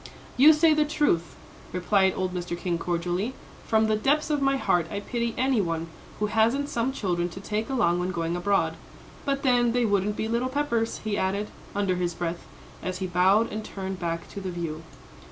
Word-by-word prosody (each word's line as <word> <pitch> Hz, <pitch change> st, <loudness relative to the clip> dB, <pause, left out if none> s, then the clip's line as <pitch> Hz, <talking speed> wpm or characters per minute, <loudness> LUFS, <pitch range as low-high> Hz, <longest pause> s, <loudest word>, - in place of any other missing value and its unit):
"You 280 Hz, +5 st, +8 dB
say 310 Hz, +1 st, +5 dB
the 305 Hz, 0 st, +3 dB
truth," 290 Hz, -, 0 dB, 0.4 s
replied 190 Hz, +1 st, +2 dB
old 185 Hz, -1 st, -2 dB
Mr. 175 Hz, -1 st, -3 dB
King, 175 Hz, -1 st, -2 dB
cordially; 175 Hz, +8 st, -2 dB, 0.3 s
"from 220 Hz, 0 st, +3 dB
the 215 Hz, 0 st, +2 dB
depths 290 Hz, +7 st, +1 dB
of 295 Hz, -1 st, +1 dB
my 275 Hz, 0 st, +3 dB
heart 175 Hz, -10 st, +1 dB
I 200 Hz, -, -3 dB
pity 235 Hz, +2 st, -2 dB
any 260 Hz, -3 st, +2 dB
one 165 Hz, -2 st, -2 dB, 0.3 s
who 210 Hz, -, 0 dB
hasn't 230 Hz, +7 st, +2 dB
some 235 Hz, +3 st, 0 dB
children 175 Hz, -8 st, -1 dB
to 185 Hz, -, -9 dB
take 210 Hz, +2 st, -3 dB
along 180 Hz, -10 st, +2 dB
when 180 Hz, +1 st, -1 dB
going 170 Hz, -1 st, -2 dB
abroad. 195 Hz, +3 st, +1 dB, 0.5 s
But 275 Hz, -1 st, -1 dB
then 245 Hz, -3 st, +3 dB
they 245 Hz, -1 st, +2 dB
wouldn't 205 Hz, 0 st, +1 dB
be 220 Hz, -, -1 dB
little 235 Hz, +3 st, 0 dB
Peppers," 245 Hz, -5 st, -1 dB
he 215 Hz, -2 st, -1 dB
added, 200 Hz, +3 st, -1 dB, 0.3 s
under 195 Hz, -3 st, +1 dB
his 175 Hz, -1 st, -1 dB
breath, 170 Hz, 0 st, -4 dB, 0.3 s
as 185 Hz, 0 st, -3 dB
he 190 Hz, -, -3 dB
bowed 185 Hz, +5 st, +3 dB
and 215 Hz, 0 st, -3 dB
turned 190 Hz, -2 st, -5 dB
back 170 Hz, -1 st, -3 dB
to 200 Hz, -, -7 dB
the 190 Hz, -, -4 dB
view. 165 Hz, -3 st, -4 dB
205 Hz, 195 wpm, -26 LUFS, 175-240 Hz, 0.5 s, You